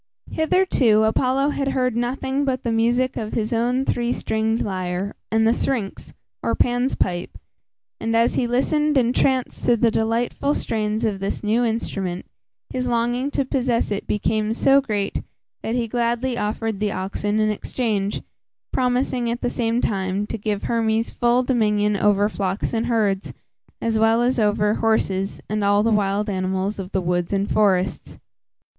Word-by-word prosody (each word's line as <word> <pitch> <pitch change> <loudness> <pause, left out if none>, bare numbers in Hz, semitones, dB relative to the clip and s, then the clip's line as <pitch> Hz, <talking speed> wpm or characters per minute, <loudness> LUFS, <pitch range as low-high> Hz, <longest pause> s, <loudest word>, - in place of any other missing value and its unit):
Hitherto 315 - +3
Apollo 260 +5 +2
had 280 -1 -2
heard 255 -3 0
nothing 265 +3 -1
but 265 -2 -1
the 235 - -1
music 240 +3 +1
of 215 -1 -4
his 220 +1 -1
own 245 +3 +1
three 240 -2 0
stringed 220 -1 0
lyre 185 0 -3 0.2
and 220 0 +3
the 230 - +4
syrinx, 235 -6 -2 0.3
or - - 0
Pan's 245 +2 +1
pipe, 175 0 -2 0.6
and, 225 0 -1
as 230 +1 +3
he 245 - 0
listened 295 +4 +1
entranced 255 +1 +1
to 240 - +4
the 230 +1 +3
delightful 235 +6 0
strains 215 0 -1
of 205 -3 -1
this 195 +2 -3
new 220 +3 +2
instrument, 195 -6 -2 0.5
his 250 0 -2
longing 240 +3 0
to 275 - -1
possess 250 -4 0
it 205 - -3
became 215 +1 0
so 275 +4 +4
great, 205 -6 -2 0.4
that 225 - -2
he 240 -2 0
gladly 240 +2 0
offered 220 -1 -2
the 210 -1 0
oxen 205 +3 -2
in 215 0 +2
exchange, 210 -2 -2 0.5
promising 250 -1 0
at 235 +1 -3
the 245 - -1
same 235 0 0
time, 195 0 -1
to - - -5
give 210 -1 -3
Hermes 225 -1 0
full 240 +1 +2
dominion 210 -4 +1
over 205 0 +3
flocks 195 0 -2
and 225 0 0
herds, 205 -5 0 0.5
as 225 -1 0
well 225 +2 +4
as 250 0 +1
over 210 0 +2
horses, 195 -4 0
and 215 0 -1
all 205 +1 +3
the 230 - +2
wild 205 0 +1
animals 190 +1 -2
of 190 0 -6
the 190 - 0
woods 175 -1 -1
and 200 0 0
forests. 190 -3 +1
225 Hz, 165 wpm, -22 LUFS, 205-245 Hz, 0.6 s, the